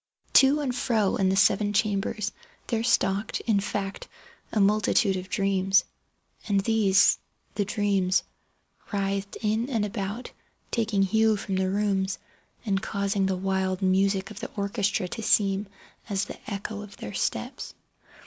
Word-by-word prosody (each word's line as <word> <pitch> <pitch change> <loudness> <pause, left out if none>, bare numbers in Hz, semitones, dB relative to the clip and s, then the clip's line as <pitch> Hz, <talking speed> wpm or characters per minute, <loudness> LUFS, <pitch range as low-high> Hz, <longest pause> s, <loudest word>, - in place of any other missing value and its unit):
To 280 +3 +6
and 265 -4 -1
fro 220 -5 +1
in 190 -1 +2
the 190 - +2
seven 205 +1 +3
chambers 210 +1 0 0.3
there 225 -1 -1
stalked, 205 -3 +1
in 215 -4 +2
fact, 195 0 -4 0.4
a 215 - 0
multitude 205 0 +3
of 185 0 -5
dreams. 195 -1 +2 0.6
And 200 -2 +2
these—the 200 -1 +1
dreams—writhed 200 0 -2
in 220 +4 0
and 225 -6 0
about 205 +2 -4 0.4
taking 215 -4 +1
hue 220 +2 +3
from 195 -1 -3
the 190 0 +1
rooms, 195 -1 0 0.5
and 195 -2 0
causing 200 -2 0
the 190 -1 -1
wild 190 0 -1
music 195 +1 +2
of 210 - -9
the 240 - -5
orchestra 200 -2 -1
to 225 - -5
seem 200 -1 +2 0.4
as 200 -1 0
the - - -10
echo 205 +1 -4
of 205 -1 -11
their 105 - -7
steps. - - -3
200 Hz, 140 wpm, -26 LUFS, 195-215 Hz, 0.6 s, To